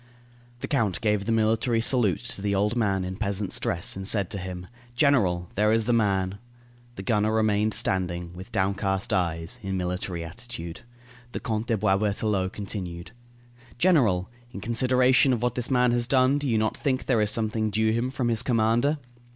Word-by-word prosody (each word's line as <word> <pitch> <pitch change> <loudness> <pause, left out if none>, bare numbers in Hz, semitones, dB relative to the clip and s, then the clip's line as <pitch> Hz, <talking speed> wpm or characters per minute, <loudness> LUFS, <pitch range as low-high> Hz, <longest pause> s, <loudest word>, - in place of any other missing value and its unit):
The - - -3
count 110 - 0
gave 105 -3 +1
the 115 - -1
military 115 +1 +2
salute 115 -4 +2
to 100 - -6
the 100 0 0
old 105 +3 +1
man 100 -5 0
in 95 +1 -5
peasant's 100 -2 -1
dress, 85 - 0
and 95 0 -4
said 100 -4 +1
to 100 - -3
him: 90 -1 -6 0.3
"General, 100 - +2
there 105 +2 +2
is 115 0 +2
the 120 +2 +1
man." 100 -3 +1 0.6
The 95 - -7
gunner 105 +1 +1
remained 110 -1 +1
standing, 90 -2 -1
with 90 +2 -10
downcast 95 0 0
eyes, 85 +5 -1
in 95 -2 -3
military 90 -1 -3
attitude. 85 -3 -8 0.5
The - - -3
Count 110 -3 -3
de 115 - +1
Boisberthelot 100 -1 0
continued: 95 -4 -6 0.7
"General, 120 - +3 0.2
in 100 - -7
consideration 125 +4 +3
of 120 -1 -2
what 125 -1 +1
this 125 -1 -3
man 125 -2 +3
has 120 0 +1
done, 130 +2 +3
do 145 -2 -2
you 115 - +2
not 110 0 0
think 135 -3 -1
there 120 -5 +2
is 105 - +2
something 110 0 0
due 110 +2 +1
him 120 +3 0
from 130 -2 -1
his 115 -1 +1
commander?" 120 +5 +2
105 Hz, 180 wpm, -26 LUFS, 95-120 Hz, 0.7 s, General